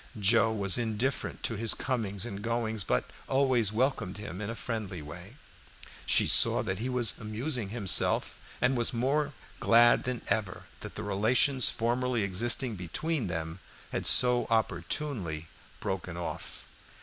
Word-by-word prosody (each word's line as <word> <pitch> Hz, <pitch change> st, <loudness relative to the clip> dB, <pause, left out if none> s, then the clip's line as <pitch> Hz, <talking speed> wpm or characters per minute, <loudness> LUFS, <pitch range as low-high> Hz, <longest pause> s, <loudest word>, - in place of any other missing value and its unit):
Joe 110 Hz, +3 st, +4 dB
was 100 Hz, 0 st, +3 dB
indifferent 120 Hz, +3 st, -3 dB
to -, -, -1 dB
his 115 Hz, 0 st, +3 dB
comings 105 Hz, -7 st, -3 dB
and 100 Hz, -4 st, -7 dB
goings, 115 Hz, -2 st, -1 dB
but -, -, 0 dB, 0.2 s
always 130 Hz, -6 st, +2 dB
welcomed 110 Hz, -5 st, -1 dB
him 105 Hz, -2 st, -8 dB
in 105 Hz, -, -5 dB
a 115 Hz, -, -5 dB
friendly 110 Hz, -7 st, -5 dB
way. 85 Hz, -, -11 dB, 0.7 s
She -, -, +4 dB
saw -, -, +6 dB
that 95 Hz, +1 st, -4 dB
he 125 Hz, +3 st, -3 dB
was 125 Hz, -4 st, +1 dB
amusing 115 Hz, +1 st, -2 dB
himself, 100 Hz, -4 st, +3 dB, 0.2 s
and 130 Hz, +2 st, +1 dB
was 120 Hz, 0 st, +2 dB
more 140 Hz, +5 st, -1 dB, 0.3 s
glad 120 Hz, +1 st, +4 dB
than 125 Hz, -1 st, -4 dB
ever 105 Hz, -5 st, -3 dB
that -, -, -10 dB
the 105 Hz, -, -5 dB
relations 115 Hz, +6 st, +3 dB
formerly 120 Hz, 0 st, -1 dB
existing 115 Hz, +5 st, -1 dB
between 130 Hz, -, -3 dB
them 80 Hz, -2 st, -5 dB, 0.3 s
had -, -, -2 dB
been -, -, -11 dB
so 125 Hz, -1 st, +5 dB
opportunely 95 Hz, -, -2 dB, 0.3 s
broken 90 Hz, -2 st, -5 dB
off. 85 Hz, -1 st, -7 dB
115 Hz, 150 wpm, -29 LUFS, 100-125 Hz, 0.7 s, saw